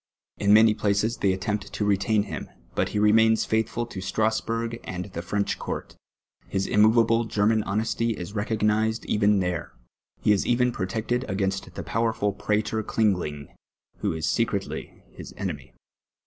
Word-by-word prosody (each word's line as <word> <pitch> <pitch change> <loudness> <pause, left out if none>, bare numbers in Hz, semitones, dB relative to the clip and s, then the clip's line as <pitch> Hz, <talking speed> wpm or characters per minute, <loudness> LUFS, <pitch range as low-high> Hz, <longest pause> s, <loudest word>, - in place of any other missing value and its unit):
In 100 0 +3
many 110 +1 +7
places 105 +2 0
they 100 - +2
attempt 100 +3 -3
to 105 - -1
retain 100 +1 +2
him, - - -6 0.2
but - - 0
he - - -3
remains 110 +2 +4
faitliful 115 +1 0
to 95 - -5
Stra.sburpj 115 +3 -1
and 90 -1 -5
the 95 -4 -6
French 100 +4 -1
court. - - -5 0.5
His 95 0 -1
immoveable 115 +2 +4
German 110 0 +2
honesty 110 +2 -1
is 90 +3 -7
reeoj^nised 110 +1 0
even 105 -1 +3
there, 90 -2 -3 0.5
he - - +2
is 100 - +3
even 125 0 +3
protected 110 +4 -2
a^^ainst 95 0 -2
the - - -5
])owerful 110 -3 0
Pra 105 +1 0
tor 110 +1 -2
Klinij^ 110 -1 +2
linj^, 75 -5 -5 0.5
who - - -1
is 80 +1 -2
secretly 100 0 -2
his - - -11
enemy. - - -5
105 Hz, 155 wpm, -25 LUFS, 100-110 Hz, 0.5 s, many